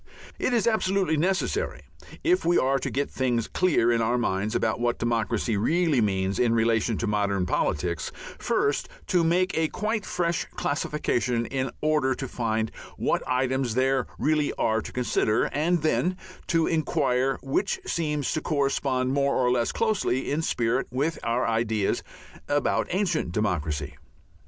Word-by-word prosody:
It - - 0
is 235 -4 +2
absolutely 195 -6 +1
necessary, 190 - -1 0.4
if 360 +2 +3
we 175 +1 +3
are 135 +1 +2
to - - -3
get 140 +2 -2
things 120 -3 0
clear 155 -10 +2
in 115 -1 +2
our 120 +2 +1
minds 105 -3 -1
about 110 0 0
what 120 0 0
democracy 115 -2 0
really 155 - +2
means 95 -2 0
in 115 -2 +3
relation 115 -1 +2
to - - -2
modern 100 -3 0
politics, 85 0 -1 0.3
first 140 - 0 0.2
to 180 -2 +2
make 180 +3 +2
a 160 0 +2
quite 215 +4 -2
fresh 170 -4 -1
classification 125 -5 -1
in 130 +1 -2
order 150 -4 +2
to 135 - -5
find 110 -2 -1 0.3
what - - 0
items 130 -2 0
there 130 0 +2
really 150 -1 +1
are 110 0 +1
to - - -8
consider, 120 -3 +1
and 160 +2 +1
then 180 +3 +1 0.3
to 165 -1 +2
inquire 135 -4 +1
which 140 +9 0
seem 150 -3 -1
to 155 - -1
correspond 135 -3 0
more 140 0 +2
or 125 -1 +2
less 120 -2 +1
closely 210 - 0
in 150 +3 0
spirit 120 -4 0
with 140 +6 -1
our 120 +2 0
ideas 110 -3 0 0.5
about 145 0 +1
ancient 180 - 0
democracy. 85 -9 -1
130 Hz, 150 wpm, -26 LUFS, 115-160 Hz, 0.5 s, if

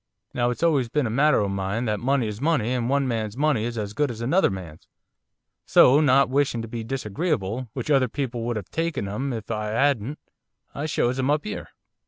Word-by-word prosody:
Now 120 0 +1
it's 125 - -3
always 140 -8 +2
been 145 +2 0
a 110 - -2
motter 140 +1 +3
o' 100 - 0
mine, 100 +4 -2
that 105 -2 -1
money 135 0 +1
is 105 +1 -5
money, 140 -7 +1
and 120 -1 -1
one 140 0 +1
man's 110 -2 -3
money 145 -6 +1
is 120 0 -4
as 105 -1 -4
good 145 +5 0
as 115 -2 -6
another 140 +12 +2
man's. 90 -5 -8 0.8
So, 135 +4 +6
not 140 -2 +4
wishing 130 -3 0
to - - -6
be 115 0 -5
disagreeable 125 - -2
which 130 +3 -3
other 135 -3 +4
people 125 -1 -4
would 120 0 -1
have 105 -4 -6
taken 165 -10 -2
'em 130 +8 -3
if 115 -2 -5
I 105 -1 -2
'adn't, 135 +2 +1 0.6
I 145 +2 -3
shows 130 -4 0
'em 130 +1 0
up 150 +4 +1
'ere. 215 - -5
125 Hz, 215 wpm, -24 LUFS, 110-140 Hz, 0.8 s, So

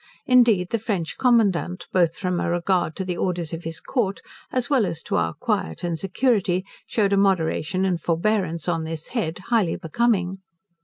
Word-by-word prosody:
Indeed 235 -8 +4
the 230 - +1
French 200 -7 -2
commandant, 205 -8 +2
both 175 -2 +2
from 180 -2 -1
a - - -1
regard 175 -1 0
to 190 - -3
the 180 -1 -2
orders 175 -3 -2
of 165 0 -6
his 165 +1 -4
Court 210 -7 -1 0.3
as 250 -2 0
well 260 -9 +3
as 165 -2 -5
to - - -2
our 80 -1 0
quiet 80 - -2
and 170 -1 -1
security, 195 -3 +1 0.2
shewed 205 -3 +1
a - - +3
moderation 185 -1 +1
and 180 -3 0
forbearance 170 -1 0
on 165 -2 0
this 160 0 -6
head 170 -10 -2
highly 215 -8 +3
becoming. 190 0 0
185 Hz, 175 wpm, -23 LUFS, 165-210 Hz, 0.3 s, Indeed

